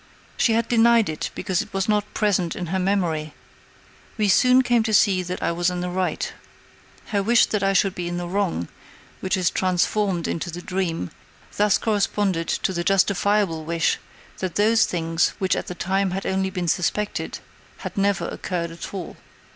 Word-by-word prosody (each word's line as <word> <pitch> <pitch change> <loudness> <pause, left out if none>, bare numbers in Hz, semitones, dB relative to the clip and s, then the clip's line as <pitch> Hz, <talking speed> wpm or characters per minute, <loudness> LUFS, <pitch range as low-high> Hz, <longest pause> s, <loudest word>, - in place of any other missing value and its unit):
She 230 - +2
had 230 0 +1
denied 235 -2 +4
it 155 - -3
because 190 -4 -1
it - - -9
was 195 +3 0
not 210 -1 0
present 190 -6 +1
in 180 - -4
her 190 - +1
memory. 175 -6 -1 0.8
We 210 -2 +2
soon 255 +6 +5
came 240 -2 +3
to 220 -1 +1
see 195 -4 +4
that 180 0 -5
I - - +1
was 175 +1 +1
in 180 -1 -3
the 180 0 -3
right. 185 0 -2 0.8
Her 205 -2 +1
wish 230 +4 +4
that 210 - -2
I 195 0 +2
should 195 0 +2
be 175 -2 -4
in 175 0 -3
the 175 0 -4
wrong, 180 - -1 0.5
which 190 +1 -1
is 180 -2 +1
transformed 185 0 0
into 170 +1 -3
the 175 +1 -7
dream, 175 - -2 0.4
thus 210 -1 +3
corresponded 200 -5 0
to 190 - -1
the 170 -1 -2
justifiable 195 -2 +2
wish 165 +1 0 0.4
that 185 -2 -3
those 220 +2 +4
things, 165 -1 0
which 190 -1 +1
at - - -4
the 180 - -5
time 190 +2 0
had 190 +2 -4
only 190 0 0
been 180 -2 -3
suspected, 205 +5 -1 0.4
had - - -7
never 200 0 +1
occurred 170 -2 -3
at 165 - -8
all. 180 -4 -6
190 Hz, 185 wpm, -23 LUFS, 175-205 Hz, 0.8 s, soon